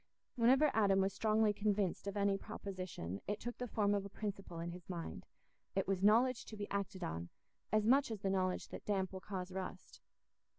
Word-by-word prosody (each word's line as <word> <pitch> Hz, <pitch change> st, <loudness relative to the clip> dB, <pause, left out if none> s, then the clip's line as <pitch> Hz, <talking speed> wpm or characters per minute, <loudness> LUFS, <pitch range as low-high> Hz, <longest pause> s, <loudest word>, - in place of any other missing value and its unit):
Whenever 265 Hz, +5 st, +5 dB
Adam 200 Hz, -3 st, +4 dB
was 195 Hz, 0 st, +2 dB
strongly 215 Hz, 0 st, +3 dB
convinced 205 Hz, -2 st, 0 dB
of 200 Hz, +1 st, -2 dB
any 200 Hz, -1 st, +3 dB
proposition, 185 Hz, -, -5 dB
it 210 Hz, +1 st, -1 dB
took 240 Hz, +1 st, -5 dB
the 250 Hz, -, -2 dB
form 205 Hz, -2 st, +2 dB
of 200 Hz, -1 st, +1 dB
a 200 Hz, -, -7 dB
principle 195 Hz, -4 st, -5 dB
in 170 Hz, +1 st, -3 dB
his 180 Hz, +1 st, -10 dB
mind: 170 Hz, -3 st, -5 dB, 0.5 s
it 195 Hz, -, +1 dB
was 190 Hz, -1 st, 0 dB
knowledge 235 Hz, +4 st, +5 dB
to 215 Hz, -, -8 dB
be 205 Hz, 0 st, -3 dB
acted 200 Hz, -1 st, -2 dB
on, 85 Hz, -, -3 dB, 0.4 s
as 215 Hz, 0 st, +3 dB
much 270 Hz, +4 st, +5 dB
as 220 Hz, -3 st, -4 dB
the 195 Hz, -, +1 dB
knowledge 185 Hz, -1 st, 0 dB
that -, -, -7 dB
damp 195 Hz, -2 st, 0 dB
will 190 Hz, -, -4 dB
cause 185 Hz, -2 st, -5 dB
rust. 185 Hz, 0 st, -6 dB
200 Hz, 200 wpm, -37 LUFS, 190-215 Hz, 0.5 s, Whenever